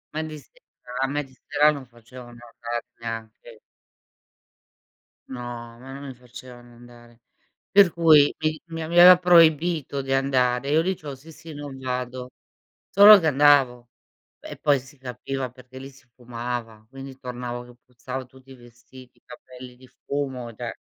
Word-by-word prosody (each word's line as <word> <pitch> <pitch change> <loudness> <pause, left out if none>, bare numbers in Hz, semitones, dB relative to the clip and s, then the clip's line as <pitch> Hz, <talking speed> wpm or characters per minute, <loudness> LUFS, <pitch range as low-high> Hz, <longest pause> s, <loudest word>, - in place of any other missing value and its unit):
A 155 - -1
me - - -4
di 155 - -8
sera 125 - -18
a - - -2
me 145 +2 -3
di 135 - -19
sera 150 +1 +4
non 140 -4 -8
facevano 120 +1 -14 0.2
andare, 120 -1 -5
neanche. 115 - -8 1.7
No, 130 -2 -7 0.4
ma 135 +1 -11
non 140 +1 -9
mi 130 - -8
facevano 125 0 -14
andare. 120 0 -18 0.5
Per 195 -4 +6
cui, 155 -4 +5
mi 155 0 -2
mi 165 0 -6
aveva 175 +3 +7
proibito 165 -4 +3
di 135 0 -4
andare, 130 -1 +1
e - - -1
io 160 +2 +3
dicevo: 160 -6 -4
"Sì, 155 +5 -15
sì, 160 +1 -12
non 145 -2 -8
vado". 125 -1 -5 0.6
Solo 205 +1 +9
che 160 - -1
andavo, 135 -4 +3 0.5
e - - -10
poi 145 -2 +1
s 130 - -16
si 145 +2 -17
capiva, 130 +1 -6
perché 125 0 -15
lì 135 +1 -9
si 135 -2 -21
fumava, 120 -2 -7
quindi 135 0 -11
tornavo 125 -1 -7
che 120 0 -16
puzzavo 130 +1 -8
tutti 130 +1 -19
i - - -12
vestiti, 120 +1 -17
i - - -33
capelli 125 0 -13
di 130 +1 -18 0.2
fumo, 130 -4 -4
cioè. 120 0 -7
130 Hz, 165 wpm, -23 LUFS, 125-145 Hz, 1.7 s, Solo